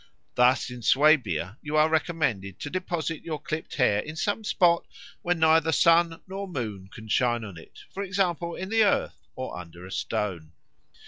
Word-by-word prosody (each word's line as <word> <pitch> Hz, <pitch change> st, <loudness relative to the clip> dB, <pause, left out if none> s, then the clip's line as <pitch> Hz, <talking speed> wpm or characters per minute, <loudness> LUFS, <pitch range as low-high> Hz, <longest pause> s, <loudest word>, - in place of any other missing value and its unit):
Thus 125 Hz, 0 st, +3 dB
in 125 Hz, 0 st, -8 dB
Swabia 115 Hz, -, +3 dB
you 150 Hz, +1 st, -2 dB
are 155 Hz, +1 st, +5 dB
recommended 155 Hz, -, -1 dB
to 145 Hz, -, -5 dB
deposit 170 Hz, -4 st, -3 dB
your 155 Hz, -3 st, -4 dB
clipped 155 Hz, +2 st, -5 dB
hair 115 Hz, -7 st, +3 dB
in 155 Hz, +8 st, -6 dB
some 205 Hz, +7 st, -1 dB
spot 175 Hz, -4 st, +3 dB, 0.4 s
where 175 Hz, 0 st, +1 dB
neither 160 Hz, 0 st, +4 dB
sun 165 Hz, +1 st, +3 dB
nor 195 Hz, +1 st, -5 dB
moon 110 Hz, -, -5 dB
can 110 Hz, -, -11 dB
shine 120 Hz, +1 st, +1 dB
on 100 Hz, -4 st, -8 dB
it, 80 Hz, -, -14 dB
for 195 Hz, -, -4 dB
example 180 Hz, -3 st, -1 dB
in 190 Hz, -, -6 dB
the 225 Hz, 0 st, +4 dB
earth 205 Hz, -, 0 dB
or 130 Hz, -, -5 dB
under 85 Hz, 0 st, -10 dB
a 95 Hz, -, -11 dB
stone. 85 Hz, -7 st, -3 dB
155 Hz, 175 wpm, -26 LUFS, 110-170 Hz, 0.4 s, are